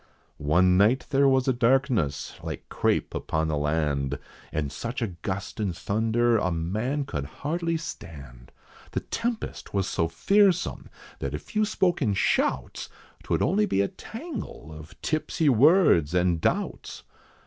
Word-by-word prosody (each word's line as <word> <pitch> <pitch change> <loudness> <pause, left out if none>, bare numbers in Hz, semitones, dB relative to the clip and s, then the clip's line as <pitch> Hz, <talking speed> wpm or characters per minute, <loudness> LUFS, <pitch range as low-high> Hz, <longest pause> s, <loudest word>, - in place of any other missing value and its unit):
One 90 +5 +3
night 110 +7 +4
there 140 0 +4
was 130 -1 +3
a 130 - +4
darkness, 120 - +1
like - - -6
crape - - 0
upon 80 0 -1
the 75 - 0
land, 75 -2 0 0.3
And 75 -3 -2
such 115 - -4
a 115 - -1
gust 100 +2 -4
and 95 -5 -2
thunder, 115 +3 +1
a 90 - 0
man 110 - -1
could 70 - -4 0.2
hardly 165 +2 0
stand. 70 - -9 0.4
The - - -1
tempest 230 - -4
was 95 -2 +1
so 85 - 0
fearsome, 190 - +2 0.3
that 70 +1 -3
if 75 - -10
you 215 0 +3
spoke 190 -5 +1
in 105 -7 +1
shouts, 65 -8 0 0.3
'Twould - - 0
only 205 +7 +2
be 100 - +2
a 100 - +1
tangle 225 - -8
of 75 0 -12
tipsy 155 0 +1
words 125 - +5
and 90 -2 +2
doubts. - - -2
105 Hz, 150 wpm, -26 LUFS, -, 0.4 s, words